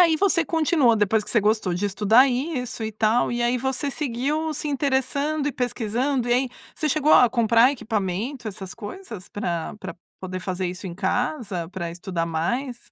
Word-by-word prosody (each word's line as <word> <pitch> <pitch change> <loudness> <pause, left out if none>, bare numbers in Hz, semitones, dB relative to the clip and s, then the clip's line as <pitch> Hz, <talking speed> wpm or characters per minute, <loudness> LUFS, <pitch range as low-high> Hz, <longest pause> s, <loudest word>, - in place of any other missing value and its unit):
aí 335 -3 +5
você 370 -1 +2
continua 310 -8 +3
depois 210 +1 +2
que - - -6
você 230 - +3
gostou 210 -3 +1
de 190 +4 -2
estudar 215 +6 +5
isso 250 -2 -3
e 220 - -2
tal, 220 +3 +2
e 240 0 -1
aí 245 +1 +1
você 265 +2 -2
seguiu 295 +4 -1
se 300 +1 -4
interessando 280 +2 0
e 290 - 0
pesquisando, 245 +2 -1
e - - +3
aí, 255 +1 +2 0.3
você 310 - -1
chegou 305 +1 +3
a 250 - +7
comprar 235 +2 +4
equipamento, 220 +1 -3
essas 190 -2 -7
coisas 230 - -8
pra 170 -4 -3
pra 185 -4 -7 0.2
poder 185 0 -5
fazer 185 0 -2
isso 180 +2 -6
em 170 - -6
casa, 200 - -2
pra 175 -3 -5
estudar 175 -1 -3
mais? 240 - -2
240 Hz, 180 wpm, -24 LUFS, 200-275 Hz, 0.3 s, a